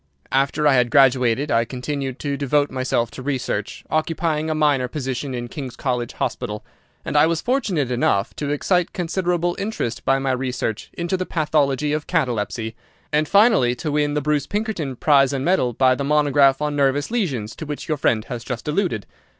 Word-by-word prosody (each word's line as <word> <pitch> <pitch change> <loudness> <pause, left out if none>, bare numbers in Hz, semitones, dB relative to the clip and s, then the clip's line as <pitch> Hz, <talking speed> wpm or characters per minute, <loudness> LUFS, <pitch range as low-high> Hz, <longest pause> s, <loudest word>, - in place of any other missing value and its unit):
After 140 +3 +2
I 145 - +5
had 125 -2 +3
graduated 130 +1 +3
I 115 0 +3
continued 135 +1 -4
to 140 -1 -1
devote 145 +1 +1
myself 130 -3 -1
to - - -8
research, 130 -6 -3
occupying 155 0 -1
a 155 - 0
minor 145 -4 +2
position 130 -1 -4
in 120 0 -4
King's 130 -1 -7
College 125 -3 -2
Hospital, 115 -1 -3 0.4
and - - -4
I 150 +2 +6
was 165 -1 0
fortunate 185 - 0
enough 115 -4 +1
to 145 - -3
excite 180 +4 +1
considerable 175 0 -1
interest 200 - -3
by 135 - +3
my 135 0 -1
research 125 -4 -3
into 175 +2 -2
the 185 - -3
pathology 150 -3 +1
of 155 0 -2
catalepsy, 110 -4 -1 0.4
and 150 +1 +2
finally 200 - +4
to 150 +5 -4
win 145 0 +1
the 150 - +1
Bruce 150 -1 0
Pinkerton 205 - -2
prize 140 +1 +4
and 135 -1 -2
medal 175 -9 +2
by 130 +2 +3
the 140 - -3
monograph 145 -1 +3
on 150 -1 -1
nervous 140 +4 +1
lesions 140 - -2
to 155 - -7
which 150 -1 -5
your 155 -2 0
friend 110 -5 +1
has 120 -2 -6
just 120 +2 -5
alluded. 150 - -1
140 Hz, 185 wpm, -22 LUFS, 125-155 Hz, 0.4 s, I